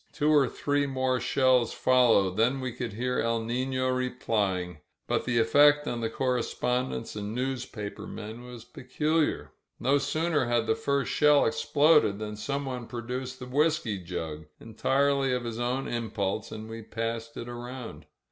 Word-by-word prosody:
Two 150 0 +1
or 140 -4 +4
three 145 0 0
more 130 -1 0
shells 130 -3 +2
followed, 115 -7 +3
then 120 +5 +2
we 130 -1 -3
could 120 -2 -5
hear 125 +3 -1
^^El 115 -1 0
Nifio" 130 +2 0
replying. 100 -9 -1 0.3
But - - -1
the 120 -1 0
effect 145 +6 +5
on 120 -1 -2
the 115 - -1
correspondents 125 -1 -1
and 105 +1 -4
newspaper 125 -5 -4
men 110 +2 -8
was 120 -2 -10
peculiar. 130 - -1 0.3
No 135 +4 +3
sooner 155 0 0
had 120 -1 +1
the 110 - +2
first 140 +4 -1
shell 150 -1 +5
ex - - -1
ploded 145 -9 +4
than 105 0 -5
someone 125 +2 -4
produced 125 +2 -5
the 125 - -8
whisky 140 -6 +1
jug, 80 -3 -6
entirely 135 +4 +1
of 125 -1 -1
his 115 -1 -5
own 125 +3 -1
impulse, 110 -3 -2
and 110 0 -7
we 115 0 -7
passed 115 +1 -4
it 120 - -6
around. 120 0 -8
125 Hz, 155 wpm, -28 LUFS, 115-135 Hz, 0.3 s, effect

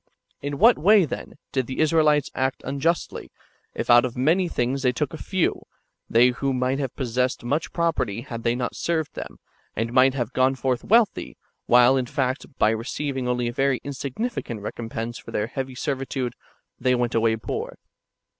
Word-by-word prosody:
In 145 0 -3
what 230 - +6
way, 200 +1 +6
then, - - -7
did 130 -3 -1
[the 130 - -5
Israelites] 155 -2 +3
act 130 0 -1
unjustly, 140 +6 -1 0.5
if - - -3
out 120 0 +7
of 125 -1 -4
many 165 +8 +2
things 130 -2 -1
they 125 -2 +3
took 145 +3 -2
a 160 - -7
few, 190 -3 0 0.5
they 120 +2 +5
who 135 +2 -1
might 130 +2 0
have 135 -4 -3
possessed 125 0 -1
much 145 +7 -1
property 160 - -1
had 115 -1 -7
they 115 +1 +1
not 125 0 -3
served 160 -3 -1
them, - - -7 0.4
and 115 +2 -2
might 130 +1 +5
have 120 -2 -2
gone 130 +1 +3
forth 130 -2 -1
wealthy, 225 0 +2 0.3
while, 125 +2 +6
in 125 -2 -1
fact, 130 +1 -2
by 110 - +4
receiving 130 +3 -3
only 125 -1 0
a 120 - -3
very 135 0 +1
insignificant 140 - -4
recompense 115 +2 -5
for - - -12
their 105 - -1
heavy 130 +2 -5
servitude, 135 -2 -3 0.5
they 125 0 +2
went 120 -1 -1
away 115 0 +2
poor? 110 - -5
130 Hz, 175 wpm, -24 LUFS, 120-145 Hz, 0.5 s, out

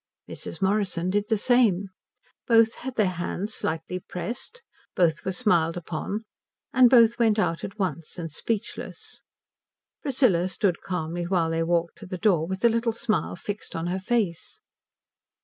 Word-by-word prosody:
Mrs. - - -5
Morrison 190 -3 +1
did 205 +1 +1
the 220 - +3
same. 205 -5 +3 0.6
Both 225 -1 +5
had 260 0 -7
their 215 - +3 0.2
hands 205 +4 -3
slightly 165 +3 -3
pressed, 235 - -6 0.3
both 165 -4 +2
were 190 - -1
smiled 175 -6 +2
upon, 175 +5 -4 0.5
and 255 -1 +7
both 235 -1 +6
went 225 -2 +3
out 165 -6 0
at 200 - -6
once 170 -5 -3
and 165 -2 -5
speechless. 215 +7 -4 0.8
Priscilla 240 -11 +2
stood 185 -1 0
calmly 175 -1 -3
while 170 -2 +1
they 165 0 0
walked 170 0 0
to - - -10
the 185 0 -5
door, 175 -5 +2
with 190 +1 -4
the 235 - +6
little 230 0 0
smile 220 -4 -1
fixed 205 +4 -6
on 165 - -2
her 180 +2 -1
face. 190 -5 -1
190 Hz, 155 wpm, -26 LUFS, 170-225 Hz, 0.8 s, and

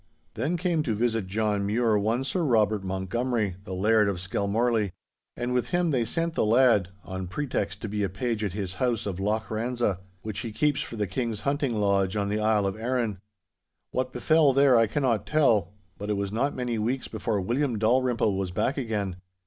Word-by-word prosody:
'Then 150 +10 -1
came 170 -2 +1
to 115 -7 -1
visit 115 -3 0
John 105 0 0
Mure 110 +2 +2
one 110 +5 +1
Sir 140 +7 -1
Robert 110 - +2
Montgomery, 100 +2 -1
the 95 - -5
Laird 105 +2 +3
of 95 -3 -2
Skelmorlie. 100 +2 0 0.4
And 120 +1 -2
with 125 -1 0
him 175 -2 +1
they 125 -4 +1
sent 165 +6 -1
the - - +1
lad, 110 -4 +4
on 95 0 -5
pretext 125 0 -3
to - - -2
be 105 0 -2
a 100 - 0
page 110 +4 -2
at 100 -4 -2
his 95 -3 -4
house 120 -4 +1
of 95 -3 -3
Loch 110 +3 -1
Ranza, 115 -3 -1 0.2
which 110 -2 -4
he 115 -4 -4
keeps 150 +6 +1
for - - -6
the 105 -2 0
King's 110 +2 -3
hunting 140 -3 0
lodge 100 -2 +1
on 100 -1 0
the 105 +1 0
Isle 105 -1 +2
of 95 -1 -1
Arran. 115 -3 -1 0.7
What 130 0 -1
befell 145 +3 +3
there 140 -1 +5
I 115 -1 +5
cannot 120 -2 0
tell, 115 - +3 0.3
but 105 +1 -5
it 105 - 0
was 100 0 -2
not 130 +7 0
many 125 -3 -2
weeks 125 +4 -1
before 110 -1 -2
William 120 +5 0
Dalrymple 115 -1 +2
was 95 -1 -2
back 125 +10 -1
again. 105 -8 -2
110 Hz, 195 wpm, -27 LUFS, 100-125 Hz, 0.7 s, there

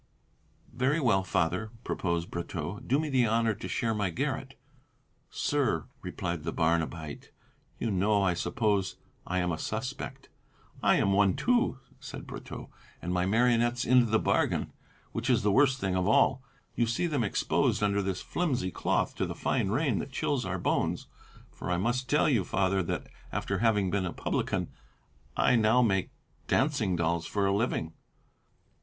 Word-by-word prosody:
"Very 130 +6 +1
well, 110 -9 +3
Father," 90 +4 0
proposed 85 -2 -2
Brotteaux, 85 +2 -4
"do 135 +4 +1
me 155 - -1
the 130 -4 +3
honour 115 0 +2
to - - -7
share 115 -2 0
my 105 -3 0
garret." 85 - -3 0.7
"Sir," 130 - 0 0.2
replied 85 -2 -4
the 80 - -2
Barnabite, 80 -2 -1 0.5
"you 115 - -1
know, 100 +2 +2
I 95 -2 +3
suppose, 100 0 0 0.3
I 90 - -1
am 90 -1 +1
a 80 - -3
suspect." - - -5 0.5
"I - - +4
am 100 - +2
one 100 -2 +4
too," 240 - +2 0.2
said - - -8
Brotteaux, - - -8 0.3
"and 90 - -3
my 90 0 +1
marionettes 120 +2 +2
into 125 -1 +5
the 110 0 +3
bargain, - - 0 0.4
which - - -3
is - - +3
the 105 - +3
worst 135 +3 +4
thing 95 -4 -1
of 90 0 +1
all. 130 +4 +4 0.3
You 120 - +1
see 120 +9 0
them 145 -7 0
exposed 105 0 +1
under 100 0 +2
this 95 -2 -3
flimsy 130 - -1
cloth - - 0
to - - 0
the - - -5
fine - - 0
rain - - +1
that - - -5
chills - - -1
our - - -2
bones. - - 0 0.5
For, - - -7
I 90 - +1
must 120 +6 -1
tell 150 - +3
you, 120 -10 +3
Father, 95 +1 +1
that 85 - -3 0.3
after 100 -1 -2
having 105 -4 +2
been 95 -2 0
a - - -4
publican, - - -2 0.7
I 125 - +4
now 115 +2 +4
make 95 -5 +1 0.4
dancing 130 -10 +1
dolls 85 0 0
for 100 -1 0
a 100 - +2
living." 100 -7 -1
100 Hz, 165 wpm, -29 LUFS, 90-120 Hz, 0.7 s, into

